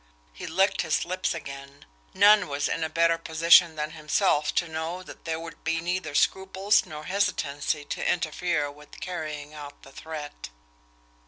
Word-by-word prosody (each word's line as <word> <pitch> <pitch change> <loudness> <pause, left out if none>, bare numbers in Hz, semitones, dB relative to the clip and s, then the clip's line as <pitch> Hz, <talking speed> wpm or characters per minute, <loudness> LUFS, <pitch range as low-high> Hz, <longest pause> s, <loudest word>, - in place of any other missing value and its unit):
He - - -8
licked 190 +4 +2
his 160 -3 0
lips 185 0 -1
again 140 -2 -9 0.3
none 205 -2 +6
was 145 0 -1
in 165 - -2
a 160 - -1
better 165 +1 +2
position 165 +1 +5
than 150 0 -3
himself 155 0 +1
to 170 - +1
know 160 +3 -4
that - - -13
there 160 -1 -2
would 165 0 -10
be 165 0 0
neither 170 -3 -3
scruples 190 +4 +2
nor 150 -1 -8
hesitancy 150 -6 -1
to - - -1
interfere 155 -3 -1
with 150 0 -15
carrying 155 -4 -5
out 145 -1 -10
the 135 - -14
threat. 150 - -8
160 Hz, 160 wpm, -26 LUFS, 150-180 Hz, 0.3 s, none